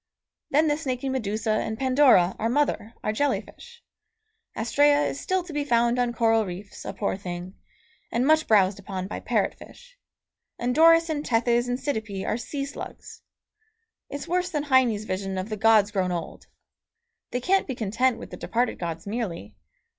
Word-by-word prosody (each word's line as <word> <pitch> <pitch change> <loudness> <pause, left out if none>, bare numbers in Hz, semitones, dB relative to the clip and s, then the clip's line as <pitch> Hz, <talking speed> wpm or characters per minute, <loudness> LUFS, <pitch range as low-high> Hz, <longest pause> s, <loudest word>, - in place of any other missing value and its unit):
Then 305 +3 +3
the 295 0 +1
snaky 270 -3 -3
Medusa 220 -4 -1
and 220 0 -1
Pandora, 255 -9 +4
our 225 - 0
mother, 240 -4 0
are 215 - 0
jelly 285 +6 +1
fish; 475 0 -15 0.7
Astræa 285 +6 +3
is 280 - -4
still 375 -1 -1
to 345 -3 -10
be 295 0 -1
found 240 -2 +2
on 245 -1 +1
coral 225 -1 +2
reefs, 190 +1 -8
a - - -3
poor 200 - -2
thing, 180 -1 -7 0.6
and 240 +2 +1
much 315 +1 +3
browsed 200 -2 +4
upon 190 -1 -5
by 195 - -5
parrot - - 0
fish; - - -16 0.6
and 245 +1 -1
Doris 330 +2 +6
and 300 -2 -2
Tethys 240 0 +1
and 245 +1 -1
Cydippe 220 -9 -3
are - - 0
sea 275 +4 -4
slugs. 280 - -9 0.9
It's 285 +3 -6
worse 360 +1 0
than 300 -5 -2
Heine's 260 -7 +3
vision 190 -1 -3
of 185 +3 -4
the 215 - -2
gods 215 -1 +4
grown 190 -3 0
old. 170 -2 -6 0.8
They 245 - -2
can't 385 +9 +1
be 260 - -3
content 230 +3 0
with - - -10
the - - -7
departed 240 +1 -1
gods 165 -2 -5
merely. 195 - -4
235 Hz, 175 wpm, -25 LUFS, 205-285 Hz, 0.9 s, Doris